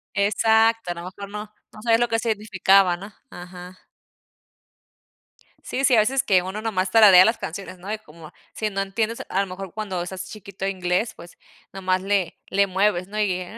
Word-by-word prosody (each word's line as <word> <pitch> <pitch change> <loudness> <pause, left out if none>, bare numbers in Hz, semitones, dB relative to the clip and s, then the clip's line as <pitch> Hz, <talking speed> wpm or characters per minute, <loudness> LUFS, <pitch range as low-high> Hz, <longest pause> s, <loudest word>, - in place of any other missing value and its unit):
Exacto, 220 0 +2
a - - -1
lo 170 - -8
mejor 195 +2 -9
no 210 +1 -7 0.2
no 215 - -12
sabía 230 -1 +3
lo 240 +1 +1
que 225 - 0
significaba, 195 -4 +2
¿no? 200 +3 -11 0.2
Ajá. 180 +1 -11 1.9
Sí, 265 - -3
a - - +6
veces 260 +5 +2
que 185 -2 +3
uno, 190 +3 -5
nomás 190 -4 -1
tararea 195 -4 +8
las 225 +1 +2
canciones, 185 +2 -7
¿no? 190 +4 -8
Y 215 - -2
como, 160 -4 -14 0.2
si 215 - -2
no 195 -1 -2
entiendes, 220 +4 -2
a 195 - 0
lo 200 - -2
mejor 185 0 -8
cuando 200 -4 -4
estás 190 +1 -6
chiquito, 200 -2 -8
inglés, 185 +3 -1
pues, 170 +1 -14 0.4
nomás 185 -1 -1
le 195 -3 -1
le 200 +1 +2
mueves, 190 -1 +1
¿no? 210 +1 -5
Y, 185 -3 0
195 Hz, 180 wpm, -23 LUFS, 185-215 Hz, 1.9 s, tararea